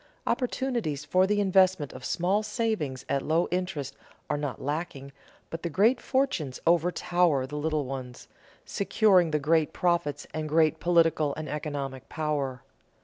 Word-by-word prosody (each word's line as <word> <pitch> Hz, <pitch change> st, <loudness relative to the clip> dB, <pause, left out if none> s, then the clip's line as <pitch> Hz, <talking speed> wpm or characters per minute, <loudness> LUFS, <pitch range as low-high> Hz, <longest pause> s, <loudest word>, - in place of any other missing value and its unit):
Opportunities 240 Hz, -, -1 dB
for 185 Hz, +4 st, +3 dB
the 205 Hz, +1 st, +1 dB
investment 185 Hz, -6 st, +3 dB
of 130 Hz, -, -10 dB
small 185 Hz, +9 st, +1 dB
savings 210 Hz, -, -2 dB
at 140 Hz, -1 st, 0 dB
low 160 Hz, +4 st, +1 dB
interest 155 Hz, -7 st, -3 dB, 0.4 s
are -, -, +1 dB
not 145 Hz, -6 st, -4 dB
lacking, 145 Hz, -1 st, -4 dB, 0.4 s
but 165 Hz, -, -5 dB
the 170 Hz, -, -3 dB
great 220 Hz, -, +3 dB
fortunes 260 Hz, -, -1 dB
overtower 170 Hz, -3 st, +2 dB
the 145 Hz, +3 st, -8 dB
little 155 Hz, -1 st, -1 dB
ones, 130 Hz, -2 st, -7 dB, 0.4 s
securing 195 Hz, -4 st, +3 dB
the 155 Hz, -, +1 dB
great 155 Hz, +1 st, +1 dB
profits 170 Hz, -5 st, 0 dB
and 155 Hz, -1 st, -3 dB
great 160 Hz, 0 st, +3 dB
political 165 Hz, -4 st, +2 dB
and 155 Hz, 0 st, -5 dB
economic 140 Hz, -2 st, -5 dB
power. 145 Hz, -5 st, -2 dB
160 Hz, 145 wpm, -27 LUFS, 145-180 Hz, 0.4 s, for